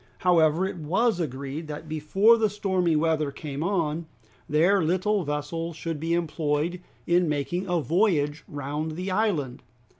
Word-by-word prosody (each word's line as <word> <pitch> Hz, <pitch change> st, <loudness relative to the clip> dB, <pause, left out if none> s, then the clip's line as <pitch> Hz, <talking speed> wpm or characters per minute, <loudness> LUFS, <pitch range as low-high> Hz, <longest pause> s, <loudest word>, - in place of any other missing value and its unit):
However, 170 Hz, -1 st, +3 dB
it 190 Hz, -, -4 dB
was 185 Hz, +7 st, +1 dB
agreed 140 Hz, +1 st, -4 dB
that 150 Hz, +1 st, -7 dB
before 155 Hz, +9 st, +4 dB
the 220 Hz, -2 st, +2 dB
stormy 190 Hz, -5 st, 0 dB
weather 155 Hz, -2 st, +1 dB
came 140 Hz, 0 st, -6 dB
on, 165 Hz, -4 st, -1 dB, 0.4 s
their 175 Hz, +6 st, +4 dB
little 185 Hz, +4 st, +1 dB
vessel 150 Hz, +3 st, -3 dB
should 165 Hz, -1 st, -4 dB
be 165 Hz, +2 st, 0 dB
employed 165 Hz, +1 st, -1 dB, 0.2 s
in 175 Hz, -1 st, +3 dB
making 175 Hz, +6 st, -2 dB
a 175 Hz, -1 st, +2 dB
voyage 160 Hz, -4 st, +1 dB
round 145 Hz, +2 st, -4 dB
the 185 Hz, +4 st, -4 dB
island. 185 Hz, -, 0 dB
165 Hz, 145 wpm, -26 LUFS, 150-180 Hz, 0.4 s, before